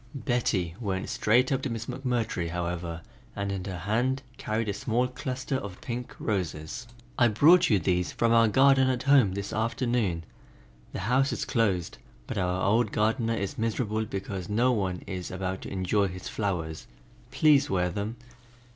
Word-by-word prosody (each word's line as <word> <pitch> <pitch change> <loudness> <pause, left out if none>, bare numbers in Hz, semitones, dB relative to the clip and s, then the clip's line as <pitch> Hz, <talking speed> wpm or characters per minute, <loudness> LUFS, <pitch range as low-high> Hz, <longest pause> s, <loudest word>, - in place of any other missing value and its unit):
Betty 120 - 0
went 95 -5 -2
straight 125 +5 +2
up 135 -1 +1
to 135 - -2
Miss 115 -1 -4
McMurtry, 125 -9 -2
however, 85 -1 -3 0.3
and 100 0 -2
in 95 -2 -3
her 95 -3 -4
hand 120 +9 0 0.2
carried 110 +1 -1
a 100 - 0
small 115 +5 0
cluster 130 0 -3
of 100 -7 -7
pink 120 0 -5
roses. 90 +2 -3 0.3
"I 120 - +6
brought 165 +11 +5
you 105 - +5
these 90 0 0
from 115 -1 +1
our 115 -1 +6
garden 135 +3 +5
at 125 -1 -1
home 135 -9 +5
this 100 +1 -4
afternoon; 115 -6 0 0.7
the - - -5
house 130 +7 +2
is - - -2
closed, 100 -9 0 0.3
but - - -3
our 90 0 0
old 110 +1 +2
gardener 115 +2 +1
is 100 -1 -4
miserable 110 -1 -1
because 95 -2 -5
no 120 +5 +3
one 95 -6 -1
is 90 -2 -5
about 95 0 -3
to - - -7
enjoy 100 +2 +1
his 90 0 -7
flowers. 85 -7 -3 0.4
Please 140 +2 +4
wear 90 -1 +1
them." 105 +5 -3
110 Hz, 165 wpm, -28 LUFS, 95-125 Hz, 0.7 s, I